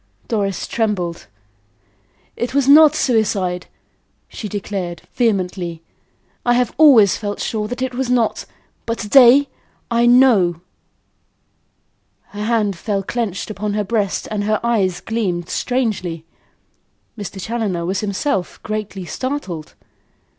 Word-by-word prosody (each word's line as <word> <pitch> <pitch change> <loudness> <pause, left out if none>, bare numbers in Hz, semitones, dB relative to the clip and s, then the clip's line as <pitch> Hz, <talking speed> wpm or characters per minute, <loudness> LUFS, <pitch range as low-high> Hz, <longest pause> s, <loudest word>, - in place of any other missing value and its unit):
Doris 200 -4 -1
trembled. 195 -7 -2 1.1
"It 240 +2 -3
was 280 -2 +2
not 305 +1 +7
suicide," 200 -9 0 0.6
she 210 - -7
declared, 195 -4 -5
vehemently. 180 -7 -1 0.6
"I 240 0 +3
have 245 -1 +1
always 255 -11 +7
felt 205 -2 -4
sure 215 -2 -2
that 245 +3 -4
it 260 -1 -3
was 255 0 -2
not; 240 -3 +1 0.4
but 230 0 -1
to 210 - -5
day 270 +3 +7 0.4
I 235 0 +3
KNOW." 225 -10 +4 1.7
Her 210 0 -6
hand 215 -4 +1
fell 195 +2 -2
clenched 215 -2 -3
on 210 0 -2
her 210 - 0
breast 205 -2 -1
and 205 -1 -2
her 215 0 +1
eyes 205 -7 0
gleamed 185 -7 -2
strangely. 200 -10 -2 0.9
Mr. 205 -3 -7
Challoner 200 -5 -2
was 190 +2 -1
himself 200 -1 -2
greatly 210 -3 -4
startled. 195 - -5
210 Hz, 120 wpm, -19 LUFS, 190-240 Hz, 1.7 s, not